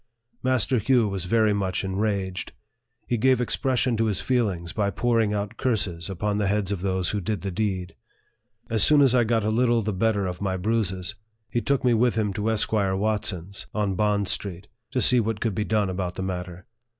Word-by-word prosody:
Master 130 -1 +2
Hugh 120 0 +3
was 95 -2 -3
very 110 +2 +3
much 95 -2 -1
enraged. 95 -1 -2 0.5
He 120 - -1
gave 130 +1 +4
expression 125 0 0
to 115 - +2
his 105 -4 0
feelings 100 -10 -1
by 105 -2 0
pouring 115 +1 +1
out 105 0 -3
curses 100 -9 -1
upon 100 +2 -1
the 105 - +1
heads 100 -1 0
of 100 -3 -2
those 95 -2 0
who 105 - -2
did 105 +3 -2
the 100 - -3
deed. 95 -2 -2 0.7
As 110 -2 0
soon 150 +6 +6
as 130 -3 +4
I 125 -1 +4
got 115 -1 +1
a 110 - +1
little 120 0 +2
the 105 0 -1
better 105 0 +1
of 90 0 -4
my 95 -2 -1
bruises, 95 -2 -1 0.4
he 120 - 0
took 140 +1 0
me 125 -2 +4
with 120 +1 +2
him 105 -3 0
to 105 +1 -1
Esquire 105 -3 +1
Watson's, 100 -2 -3
on 105 -2 0
Bond 105 0 +1
Street, 95 0 -3 0.2
to 125 - -1
see 125 - +5
what 110 -1 -1
could 115 -2 -1
be 105 - -1
done 105 -2 +1
about 90 -1 -3
the 95 - -4
matter. 90 -1 -5
105 Hz, 200 wpm, -25 LUFS, 95-115 Hz, 0.7 s, soon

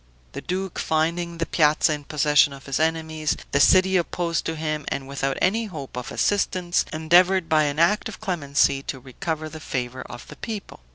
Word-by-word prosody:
The - - -7
duke, 190 0 -4
finding 170 +2 -1
the 165 - -1
piazza 155 -1 +3
in 145 -1 -6
possession 150 -1 +3
of 135 -1 -12
his 135 0 -2
enemies, 160 -1 -1
the 140 - +2
city 185 +5 +5
opposed 170 -1 -1
to 165 - -2
him, 155 -1 -3
and 135 -1 -3
without 135 0 -2
any 225 +5 +1
hope 155 - -8
of 125 -1 -5
assistance, 185 -3 +1
endeavored 175 +3 +3
by 155 -1 +3
an 145 0 -2
act 170 +6 +2
of - - -10
clemency 145 -8 +1
to 135 - -6
recover 155 +5 -4
the 155 0 -9
favor 130 -3 -4
of 120 - -10
the - - -12
people. 215 -4 -7
160 Hz, 185 wpm, -24 LUFS, 145-175 Hz, -, city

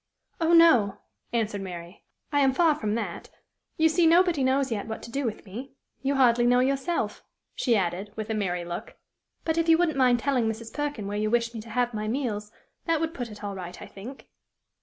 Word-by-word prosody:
"Oh, 330 0 +2
no!" 255 -13 +6 0.3
answered 220 -3 -1
Mary; 175 0 -8 0.3
"I 290 - +2
am 270 -2 +4
far 330 -1 +4
from 215 -7 -2
that. 205 -7 -4 0.5
You 320 - +5
see 325 +1 +3
nobody 340 -3 +4
knows 265 0 +2
yet 210 -2 -2
what 220 - -6
to 235 - -9
do 275 +1 -2
with 220 -2 -4
me. 240 +8 -8 0.3
You 275 +1 0
hardly 240 -2 +4
know 245 0 +5
yourself," 275 +6 -1 0.3
she 240 -3 +1
added, 190 +1 -1
with 220 0 -4
a - - +1
merry 180 -5 -1
look. 175 0 -6 0.5
"But, 325 0 +1
if 330 0 +1
you 325 - +7
wouldn't 320 -5 +1
mind 250 -2 +5
telling 255 -1 +1
Mrs. 225 +1 -6
Perkin 290 -8 -3
where 205 +1 -3
you 215 0 0
wish 235 0 +1
me 225 - -5
to 230 - -13
have 245 +2 0
my 215 0 -3
meals, 215 -4 -2 0.3
that 330 -2 +2
would 325 0 -2
put 245 -7 -5
it 210 -1 -11
all 200 -1 -3
right, 180 -2 -7
I - - -8
think." 235 +8 -10
240 Hz, 215 wpm, -27 LUFS, 210-280 Hz, 0.5 s, you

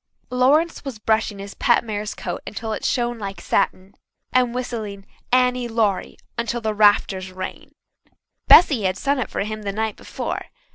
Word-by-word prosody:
Lawrence 285 +7 +3
was 270 -6 -6
brushing 220 -1 0
his 200 0 -8
pet 240 - +3
mare's 210 -2 -4
coat - - -5
until 220 +1 -4
it - - -5
shone 240 -1 0
like 195 -2 -5
satin, 195 0 -1 0.4
and 250 -1 +3
whistling 220 -6 -4 0.3
"Annie 250 -1 +3
Laurie" 220 -4 0 0.2
until 235 +1 -1
the 220 -2 -1
rafters 205 -3 +3
rang. 185 0 -7 0.8
Bessy 285 -9 +8
had 185 -1 0
sung 280 +6 0
it 255 - -2
for - - -3
him 215 +1 -4
the 200 -1 -3
night 220 +1 -2
before. - - -5
220 Hz, 160 wpm, -22 LUFS, 200-245 Hz, 0.8 s, Bessy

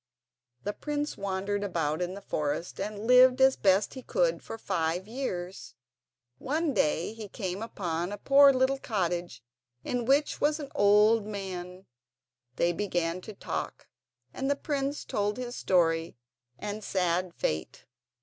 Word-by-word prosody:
The 205 - -2
prince 295 +3 -3
wandered 200 +1 -2
about 165 -4 -1
in 180 +1 -2
the 200 - -10
forest 150 +1 -3
and 205 +2 -4
lived 250 +1 +7
as 265 0 +6
best 195 +1 +3
he 260 - -7
could - - +1
for 225 - -7
five 170 -1 -1
years. 195 - -5 0.6
One 305 +2 0
day 170 -1 +1
he 220 -2 -8
came 190 -1 -4
upon 175 -5 -3
a 205 - -4
poor 280 +5 +7
little 265 +1 +1
cottage 175 - -2 0.4
in 245 -1 -2
which 280 +4 +2
was 300 +1 +2
an 280 -2 -7
old 210 +1 +4
man. 185 -2 -6 0.7
They 170 +4 +2
began 175 -2 -1
to 215 - -9
talk, - - -5 0.4
and 270 +1 -2
the 285 - +3
prince 280 0 -2
told 205 0 -1
his 250 -1 -5
story 165 -5 +1 0.4
and 210 +1 -5
sad 180 -2 0
fate. 80 0 -3
205 Hz, 145 wpm, -29 LUFS, 180-255 Hz, 0.7 s, lived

